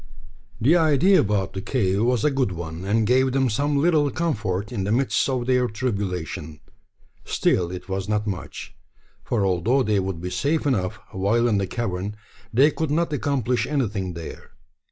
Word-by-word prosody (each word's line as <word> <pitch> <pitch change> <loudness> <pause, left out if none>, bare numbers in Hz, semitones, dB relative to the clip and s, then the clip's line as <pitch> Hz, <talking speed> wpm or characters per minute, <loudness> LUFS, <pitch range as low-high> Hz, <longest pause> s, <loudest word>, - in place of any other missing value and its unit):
The 135 +9 +4
idea 165 +3 +4
about 100 -2 0
the 95 - -4
cave 100 -3 0
was 120 -1 +1
a 150 - +4
good 130 -8 0
one, 85 0 -6
and 110 +2 +2
gave 130 +3 +3
them 130 -3 +2
some 145 +6 0
little 150 -1 +3
comfort 110 - -2
in 105 -6 -2
the 100 - -1
midst 130 +3 +1
of 130 -2 -1
their 125 -1 +2
tribulation. 95 - -3 0.6
Still, 85 -2 +1
it 90 0 -7
was 95 +1 -3
not 105 0 0
much; 100 -4 -6 0.5
for 105 -5 0
although 95 +9 +2
they 105 -3 +1
would 95 -3 -3
be 90 +2 -5
safe 150 +2 0
enough 100 -10 0
while 110 +5 +1
in 105 -4 +2
the 95 - -1
cavern, 100 -3 -3 0.4
they 135 +6 +5
could 160 +1 -2
not 160 +1 0
accomplish 130 -3 0
anything 105 - -2
there. 85 -2 -9
110 Hz, 175 wpm, -24 LUFS, 95-135 Hz, 0.6 s, they